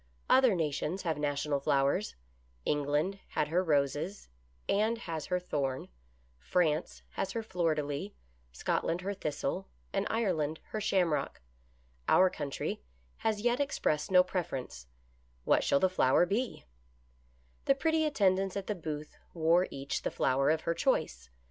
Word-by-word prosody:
Other 255 -6 +6
nations 160 +3 -1
have 160 -4 -1
national 145 0 0
flowers; 135 - +1 0.5
England 150 +6 0
had 150 - -1
her 180 +3 +2
Roses, 150 +4 0 0.4
and 220 +3 +2
has 165 -9 -5
her 180 - +1
Thorn; 140 -7 -2 0.5
France 155 - 0
has 195 0 -3
her 230 - -2
Fleur 175 -6 0
de 150 - -1
lis, 145 +8 -4 0.4
Scotland 165 - -1
her 200 +2 -2
Thistle, 170 +1 -3 0.3
and 195 +1 0
Ireland 165 -9 0
her 215 - -3
Shamrock; 180 -7 +1 0.7
our 185 0 +5
country 140 -1 -4 0.4
has 220 -1 0
as 205 - -8
yet 240 +2 +2
expressed 155 - 0
no 180 -1 +7
preference 160 - -4 0.3
— 60 0 -36
what - - +4
shall 140 - +3
the 190 - +4
flower 175 -3 +3
be 220 +7 -2 0.5
} - - -35
The 275 - +4
pretty 320 +3 +1
attendants 195 -9 +2
at 195 - -4
the 210 - -1
booth 155 -4 -6 0.2
wore 170 +2 +3
each 135 +1 -4
the - - -1
flower 135 +2 +2
of 160 0 +2
her 165 - 0
choice. 60 - 0
165 Hz, 150 wpm, -31 LUFS, 145-195 Hz, 0.7 s, no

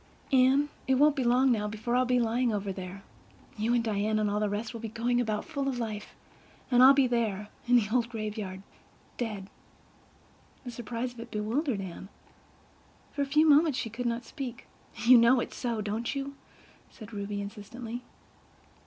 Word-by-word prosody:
"Anne, 265 +3 +4 0.2
it 265 - +4
won't 290 +2 +5
be 265 - 0
long 250 +2 +4
now 210 -3 +1
before 220 +3 -2
I'll 255 0 +3
be 250 0 +3
lying 235 +1 +1
over 200 -2 -2
there. 185 +1 -8 0.5
You 225 +2 +1
and 235 - +2
Diana 215 0 0
and 210 -1 +1
all 205 - 0
the 210 -1 0
rest 215 +4 -3
will 230 - -6
be 225 - -4
going 240 +2 0
about, 215 -3 -2
full 280 -4 -3
of 265 -2 -1
life—and 225 +2 -3
I'll 270 +2 +9
be 275 -1 +5
there—in 230 0 -1
the 235 -4 +5
old 240 -2 +2
graveyard—dead!" 210 0 -7 1.2
The 245 - -6
surprise 240 +1 -4
of 240 - -14
it 235 +1 -8
bewildered 225 +2 -1
Anne. 190 +1 -8 1.0
For 285 - -3
a 280 - 0
few 300 +3 +4
moments 300 -1 +5
she 225 -5 -3
could 240 +2 -3
not 235 0 -2
speak. 260 -5 -7 0.4
"You 245 +1 +8
know 235 +2 +5
it's - - -4
so, 235 -3 -2
don't 220 +6 -3
you?" 275 0 -4 0.6
said 220 -1 -12
Ruby 205 0 -4
insistently. 225 +4 -7
235 Hz, 175 wpm, -29 LUFS, 210-255 Hz, 1.2 s, I'll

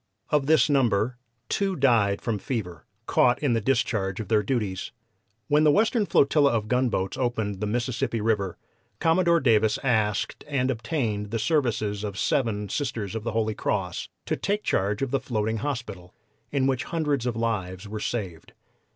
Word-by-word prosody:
"Of 145 -2 +2
this 160 +1 +5
number, 125 -4 +1 0.3
two 195 -1 0
died 115 - +3
from 115 -4 -1
fever, 95 - -5 0.2
caught 120 -1 +3
in 140 -5 +1
the 115 - +1
discharge 110 -6 0
of 110 - -5
their 110 -2 +4
duties. 100 -6 -2 0.6
When 150 +1 +4
the 155 - +6
Western 215 - +3
flotilla 140 -1 +4
of 110 -2 -1
gunboats 120 -6 0
opened 110 -6 -1
the 105 - -2
Mississippi 120 +1 -1
River 105 -4 0 0.4
Commodore 170 +1 +3
Davis 110 -5 +3
asked 110 -5 0
and 135 -3 0
obtained 110 -5 -2
the 115 - -2
services 110 -6 0
of 100 -2 -4
seven 105 -5 0
Sisters 110 -4 -3
of 110 -1 -4
the 115 -1 -3
Holy 110 -1 0
Cross 95 -4 -2 0.2
to - - 0
take 205 +1 -1
charge 100 +5 0
of 135 - -2
the 135 - +2
floating 110 -3 -1
hospital, 110 -8 -5 0.4
in 140 -2 +1
which 130 -2 0
hundreds 150 -7 -1
of 120 - -1
lives 100 -5 -2
were 110 +1 -5
saved. 95 -8 -4
115 Hz, 165 wpm, -26 LUFS, 105-135 Hz, 0.6 s, the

